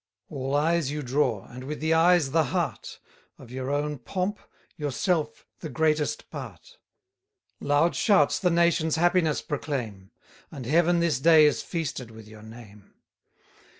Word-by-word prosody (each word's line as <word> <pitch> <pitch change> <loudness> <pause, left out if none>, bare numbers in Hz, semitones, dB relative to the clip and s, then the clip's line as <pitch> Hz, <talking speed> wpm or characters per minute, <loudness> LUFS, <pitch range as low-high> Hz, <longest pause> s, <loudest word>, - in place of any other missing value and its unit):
All 135 -1 -3
eyes 160 0 +1
you 150 0 -4
draw, 125 -5 0
and 125 +1 -10
with 150 +2 -5
the 160 +1 +1
eyes 165 -3 +4
the 160 +1 +2
heart: - - -3 0.4
Of 120 - -14
your 130 +1 -5
own 145 0 -2
pomp, 185 - -3 0.4
yourself 150 - -2
the 160 - -7
greatest 155 +2 -1
part: - - -10 0.8
Loud 145 +2 +1
shouts 150 +1 +3
the 180 - +2
nation's 170 -2 +2
happiness 175 -2 +1
proclaim, 120 -10 -5 0.4
And 130 -4 -8
Heaven 170 +5 +2
this 165 -7 +1
day 160 +1 +6
is 150 - +2
feasted 155 -8 -5
with 110 -1 -13
your 110 0 -13
name. 110 -2 -14
150 Hz, 145 wpm, -26 LUFS, 130-165 Hz, 0.8 s, day